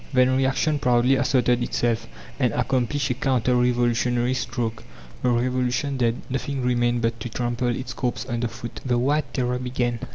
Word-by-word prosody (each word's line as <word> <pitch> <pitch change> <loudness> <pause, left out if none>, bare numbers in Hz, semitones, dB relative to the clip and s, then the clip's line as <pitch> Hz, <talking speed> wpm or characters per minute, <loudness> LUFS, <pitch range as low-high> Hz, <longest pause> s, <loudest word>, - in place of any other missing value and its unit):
Then 130 0 +4
reaction 135 +3 +1
proudly 125 0 +3
asserted 125 -2 +2
itself, 120 -1 0 0.3
and - - +2
accomplished 130 +2 0
a - - +2
counter 125 -1 +1
revolutionary 120 0 +2
stroke. 120 -3 -3 0.4
The 125 - +2
Revolution 125 +3 0
dead, 120 -1 0
nothing 135 0 -3
remained 120 -1 +1
but 115 0 0
to 120 - -5
trample 120 +1 -2
its 125 +1 -2
corpse 125 -1 -2
under 120 -1 -1
foot. 120 +1 -8
The 125 -2 +1
White 145 +5 +1
Terror 125 -1 0
began. 125 -2 -1
125 Hz, 160 wpm, -24 LUFS, 120-130 Hz, 0.4 s, Then